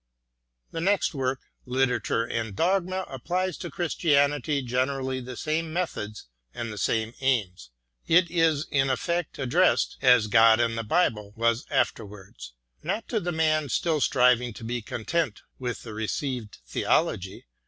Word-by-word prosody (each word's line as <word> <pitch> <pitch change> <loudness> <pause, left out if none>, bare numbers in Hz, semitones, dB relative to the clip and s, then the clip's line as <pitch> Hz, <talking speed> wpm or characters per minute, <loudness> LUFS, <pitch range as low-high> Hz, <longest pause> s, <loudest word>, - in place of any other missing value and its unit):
The 165 - -4
next 195 +1 +2
work, 130 -2 -2 0.3
"Literature 125 -2 +1
and 115 -3 -3
Dogma," 185 - 0
applies 180 +8 -2
to - - -5
Christianity 145 -4 +1
generally 130 +1 -1
the 125 -1 -8
same 160 +1 -2
methods 155 -12 -4 0.3
and 115 -2 -4
the - - -9
same 110 +6 0
aims. 100 - 0 0.4
It 170 +1 +4
is 160 -4 +2
in 135 -1 +2
effect 170 +6 -1
addressed, 155 +8 +2
as 125 -4 +6
"God 110 +1 +6
and 115 -1 +1
the 115 - -2
Bible" 105 - 0
was 115 +3 +1
afterwards, 100 - -3 0.3
not 200 +7 -3
to 225 - 0
the 175 -2 -3
man 155 -3 +1
still 160 0 0
striving 125 -2 +3
to 115 - -11
be 120 +1 -3
content 120 +3 -2 0.2
with 125 -2 -4
the 110 - -8
received 110 +1 -3
theology. 95 +9 0
130 Hz, 145 wpm, -26 LUFS, 115-160 Hz, 0.4 s, as